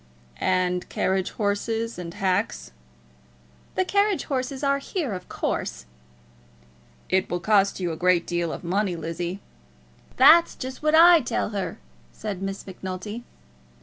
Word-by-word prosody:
"And 180 -1 0
carriage 190 -1 0
horses 225 +1 -2
and 170 -1 -7
hacks?" 195 - -1 1.0
"The 375 - +1
carriage 400 0 +2
horses 265 0 -3
are 280 0 +2
here, 280 - -3
of 180 -1 -7
course." - - -3 1.2
"It 190 0 +1
will 175 - -1
cost 200 +1 +2
you 175 -2 -1
a - - -4
great 180 -1 +3
deal 175 -1 -1
of - - -7
money, 185 +1 0
Lizzie." 170 +3 -4 0.8
"That's 325 +6 +7
just 260 0 -7
what 305 +1 +3
I 340 +1 +8
tell 240 - -1
her," 195 -5 -4 0.3
said 195 - -6
Miss 195 0 -4
Macnulty. 190 +4 -6
195 Hz, 135 wpm, -25 LUFS, 180-255 Hz, 1.2 s, I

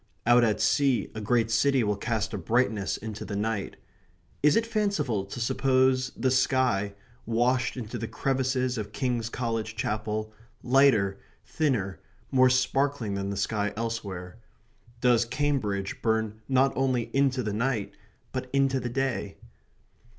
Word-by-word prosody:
Out 120 +1 +6
at 110 -3 +2
sea 135 -7 +2
a 110 - -5
great 115 +1 +1
city 130 +2 +3
will 105 -1 +1
cast 110 +1 -2
a - - -2
brightness 115 -4 0
into 110 -1 -6
the 105 - -5
night. 105 0 -2 0.7
Is 150 +1 +5
it 225 - +2
fanciful 200 - 0
to 100 - -7
suppose 130 +2 +2
the 130 +2 +1
sky, 125 -6 +1 0.3
washed 125 +3 +1
into 120 -1 -5
the 115 - -3
crevices 130 -2 -1
of 105 0 -6
King's 120 -4 -1
College 115 -2 -3
Chapel, 110 0 -3 0.3
lighter, 120 -7 +4 0.3
thinner, 125 -12 -1 0.3
more 130 -1 +5
sparkling 130 -3 +1
than 100 0 -2
the 100 - -3
sky 105 +1 -1
elsewhere? 100 -5 -4 0.6
Does 120 -2 +4
Cambridge 115 -7 -2
burn 110 -1 0
not 135 +1 +3
only 130 -3 0
into 135 -2 +2
the 105 -2 -2
night, 115 -1 -1 0.4
but 130 -1 -4
into 135 -1 +2
the 125 - -4
day? 125 -5 -2
120 Hz, 145 wpm, -27 LUFS, 105-130 Hz, 0.7 s, Out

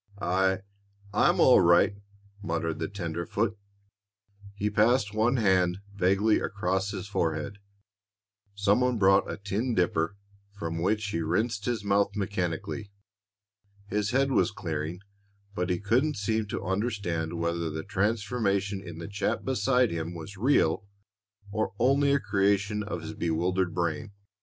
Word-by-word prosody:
"I 95 0 +1 0.5
I'm 105 - +3
all 130 - +7
right," 85 +3 +5 0.5
muttered 80 -4 -2
the - - -1
tenderfoot. 95 +3 -2 1.0
He 105 +1 -1
passed 105 0 +3
one 115 +4 +2
hand 95 -4 +3 0.2
vaguely 100 +3 +3
across 95 0 -1
his 100 -2 -5
forehead. 85 0 -2 1.0
Some 100 +3 +3
one 125 -1 +2
brought 95 -1 +4
a - - -5
tin 105 +5 -2
dipper, 90 0 +1 0.4
from 85 -4 -4
which 105 +4 +1
he 85 - -2
rinsed 100 +6 -1
his 120 -4 -1
mouth 100 0 +2
mechanically. 100 +1 -3 1.0
His 105 0 0
head 135 +3 +2
was 125 - +3
clearing, 85 -3 -4 0.5
but 90 -1 -2
he 90 -1 0
couldn't 125 +9 +1
seem 110 +1 -1
to - - -4
understand 95 -5 -2
whether 85 0 -1
the 80 +1 -5
transformation 100 -1 0
in 85 -4 -9
the 85 - -6
chap 100 0 -2
beside 130 -2 +2
him 85 +1 -4
was 85 +4 -8
real 115 -2 +2 0.6
or 105 -3 -2
only 140 +4 +3
a 140 - +3
creation 105 -1 +1
of 100 -5 -5
his 80 - -6
bewildered 90 +2 0
brain. 90 +5 -2
100 Hz, 140 wpm, -28 LUFS, 90-110 Hz, 1.0 s, all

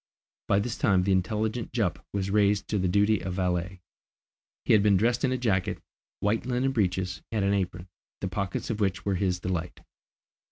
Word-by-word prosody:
By 100 - +3
this 110 +3 -2
time 95 -4 +3
the 100 - +1
intelligent 105 +5 -1
Jup - - -1
was 100 -1 -2
raised 100 -1 +2
to 105 - 0
the 95 - +1
duty 105 +3 +3
of 90 0 -4
valet. 90 0 -1 0.8
He - - +4
had 105 - +6
been 100 -2 +4
dressed 115 +4 +1
in 130 - +2
a 130 - 0
jacket, 105 -7 0 0.4
white 105 +2 +1
linen 130 +1 0
breeches, 95 -5 -1
and 105 -3 0
an 100 - +2
apron, 95 -2 -2 0.3
the 95 - -2
pockets 95 +3 -3
of 110 - -3
which 95 -2 -1
were 100 - +1
his 90 -1 0
delight. 90 -1 -3
100 Hz, 190 wpm, -27 LUFS, 95-110 Hz, 0.8 s, had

